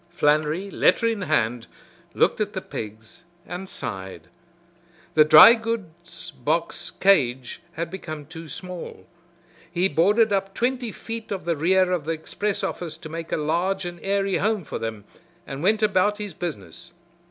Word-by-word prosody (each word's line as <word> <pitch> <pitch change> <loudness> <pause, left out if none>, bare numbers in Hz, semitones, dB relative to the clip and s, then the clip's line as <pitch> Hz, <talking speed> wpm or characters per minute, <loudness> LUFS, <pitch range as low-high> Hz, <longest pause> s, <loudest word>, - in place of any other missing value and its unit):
Flannery, 155 +6 +1
letter 230 - +3
in 225 -3 0
hand, 120 -8 0 0.5
looked - - +2
at - - -1
the - - -3
pigs 110 +1 -8 0.2
and 180 +2 -7
sighed. 95 -3 -6 0.8
The 155 - +7
dry 155 +9 +10
goods 190 -7 -5
box 155 +5 -2
cage 130 -10 +2
had 165 0 -4
become 155 -5 -7
too 160 +1 -10
small. 180 +1 -8 0.7
He 180 +2 +2
boarded 205 +7 +3
up 195 0 -1
twenty 245 -1 -1
feet 225 +1 -7
of 195 -3 -4
the 170 -1 +1
rear 185 +4 +3
of 175 -5 -1
the 165 - 0
express 200 +6 -3
office 170 -3 -4
to 155 - -10
make 165 +1 -6
a - - +1
large 175 +5 0
and 175 0 -6
airy 195 0 0
home 210 -1 0
for - - -5
them, 110 -2 -5 0.4
and 135 0 -6
went 215 +4 +2
about 205 0 +2
his 205 -3 -6
business. 175 +1 -7
175 Hz, 155 wpm, -24 LUFS, 155-200 Hz, 0.8 s, dry